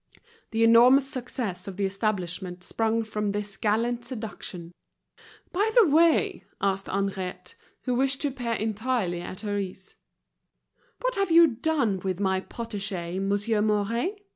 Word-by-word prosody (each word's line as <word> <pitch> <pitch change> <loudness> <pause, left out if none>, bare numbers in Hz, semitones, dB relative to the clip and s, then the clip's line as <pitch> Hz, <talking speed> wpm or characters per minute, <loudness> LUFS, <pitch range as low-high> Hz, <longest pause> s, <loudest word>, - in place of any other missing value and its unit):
The 225 0 +1
enormous 245 +4 +7
success 235 -8 -4
of 195 -1 -7
the 200 - +1
establishment 185 -3 -2
sprung 225 +2 0
from 210 -2 -2
this 205 -1 -3
gallant 235 +4 0
seduction. 210 -7 -7 0.8
"By 410 +5 +1
the 465 -6 +7
way," 325 +2 +3 0.2
asked 195 0 0
Henriette, 195 -2 -3 0.3
who 250 - 0
wished 270 +2 +1
to 290 - +1
appear 245 -3 -3
entirely 220 -4 -1
at 185 +2 -7
her 205 -2 -2
ease, 190 0 -7 1.0
"what - - 0
have 395 -2 +1
you 335 +1 +8
done 250 - 0
with, 185 0 -3
my 190 -1 +1
protégé, 195 -6 -4
Monsieur 205 +2 +1
Mouret? 220 - 0
215 Hz, 140 wpm, -26 LUFS, 195-245 Hz, 1.0 s, you